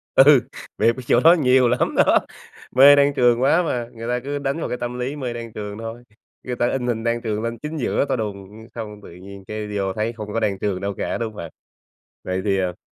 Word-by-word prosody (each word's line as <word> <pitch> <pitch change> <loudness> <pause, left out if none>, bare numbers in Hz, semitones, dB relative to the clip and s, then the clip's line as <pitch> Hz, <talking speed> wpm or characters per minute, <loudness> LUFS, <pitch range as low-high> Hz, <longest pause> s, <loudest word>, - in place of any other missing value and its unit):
Ừ, 135 -1 +6 0.3
bịp 115 +2 +3
ở 130 - -7
chỗ 120 - +4
đó 165 +5 +7
nhiều 130 -6 +4
lắm 125 +1 0
đó, - - +5 0.6
mê 140 +2 +9
Đan 140 0 +3
Trường 120 0 +3
quá 160 +6 +3
mà. 120 -7 -2
Người 115 0 -7
ta 125 0 0
cứ 145 +1 -3
đánh 140 +3 -2
vào - - -3
cái 125 - -3
tâm 120 +1 -5
lý 130 +4 -3
mê 125 -4 -4
Đan 115 -2 -8
Trường 105 0 -6
thôi, 115 +2 -7 0.4
người 125 -1 -4
ta 120 0 +1
in 125 -2 -2
hình 115 -2 -1
Đan 120 0 0
Trường 110 -2 -2
lên 115 0 -3
chính 155 +1 -5
giữa 140 +1 0
to - - +1
đùng, 105 0 -6
xong 105 -2 -7
tự - - -12
nhiên 95 +2 -12
cái 105 0 -5
vô 95 -1 -1
thấy 110 +3 -2
không 105 -2 -7
có 115 - 0
Đan 100 -3 -1
Trường 100 -3 -2
đâu 100 0 -2
cả, - - -2
đúng 110 -2 -4
hông - - -15
bạn? 85 -1 -7 0.7
Vậy 95 0 -2
thì, 95 -1 +1
à 90 -2 -2
115 Hz, 250 wpm, -22 LUFS, 105-130 Hz, 0.7 s, mê